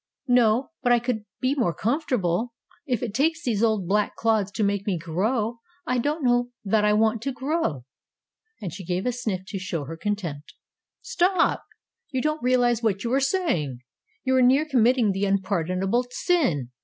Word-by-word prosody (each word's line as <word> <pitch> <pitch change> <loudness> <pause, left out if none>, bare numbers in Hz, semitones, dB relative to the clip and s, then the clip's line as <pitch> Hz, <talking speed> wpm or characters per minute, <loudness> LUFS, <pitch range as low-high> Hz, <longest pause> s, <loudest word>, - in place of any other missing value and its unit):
"No, 245 +1 +3
but 245 -2 +2
I 240 - +6
could 235 -3 -2 0.2
be 260 +1 +2
more 230 - 0
comfortable. 230 - -1 0.3
If 245 -3 -1
it 225 -4 -3
takes 320 +7 +1
these 220 -4 0
old 215 -5 +1
black 210 +2 +1
clods 220 -3 +1
to 215 - -1
make 200 0 0
me 190 -4 +1
grow 215 +8 -1 0.3
I 250 -4 0
don't 295 +5 -1
know 245 0 +2 0.2
that 210 +2 +2
I 210 - +4
want 220 +1 +2
to 275 - -2
grow," 260 - -2 0.7
and 180 -6 -5
she 190 - -7
gave 180 +2 -2
a 250 - +2
sniff 225 -7 -3
to 195 - -4
show 175 -5 -3
her 165 +4 -6
contempt. 170 -7 -4 0.5
"Stop! 360 -1 +1 0.5
You 260 - -2
don't 305 +3 -1
realize 245 -2 +2
what 205 -4 0
you 235 +1 -1
are 270 - +4
saying! 225 - 0 0.4
You 260 -1 +2
are - - +5
near 265 +5 +4
committing 245 -5 +3
the 195 +1 -1
unpardonable 195 +3 0
sin. 245 - 0
225 Hz, 180 wpm, -25 LUFS, 195-255 Hz, 0.7 s, I